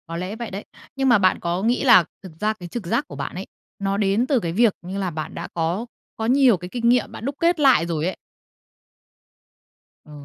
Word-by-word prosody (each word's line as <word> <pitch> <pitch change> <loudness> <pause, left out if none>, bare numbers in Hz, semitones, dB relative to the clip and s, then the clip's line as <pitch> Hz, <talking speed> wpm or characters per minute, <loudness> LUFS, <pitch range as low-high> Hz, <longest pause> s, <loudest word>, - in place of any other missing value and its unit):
Có 165 0 -5
lẽ 185 +4 -4
vậy 235 0 -6
đấy. 195 +2 -6 0.3
Nhưng 270 -1 +1
mà 240 - +6
bạn 185 -2 +2
có 175 +2 -2
nghĩ 240 +4 +1
là 235 -9 +7 0.2
thực 185 - -9
ra 215 +1 +1
cái 180 -5 -10
trực 230 +1 -6
giác - - 0
của 145 - -10
bạn 140 +3 -5
ấy, 190 +2 -6 0.3
nó 195 0 -1
đến 205 +4 +1
từ 270 -3 +2
cái 170 -6 -3
việc, 220 +3 +3
như 185 +3 -6
là, 190 -2 -1
bạn 155 -2 -6
đã - - -5
có 170 +7 -1 0.3
có 220 - -2
nhiều 255 -3 +4
cái 180 +1 -9
kinh 235 +2 0
nghiệm 250 +1 +2
bạn 225 - -8
đúc 280 +1 -3
kết 340 0 +2
lại 265 - +5
rồi 165 -2 -2
ấy. 185 - -2 1.9
Ờ. 150 - -16
200 Hz, 235 wpm, -22 LUFS, 175-240 Hz, 1.9 s, là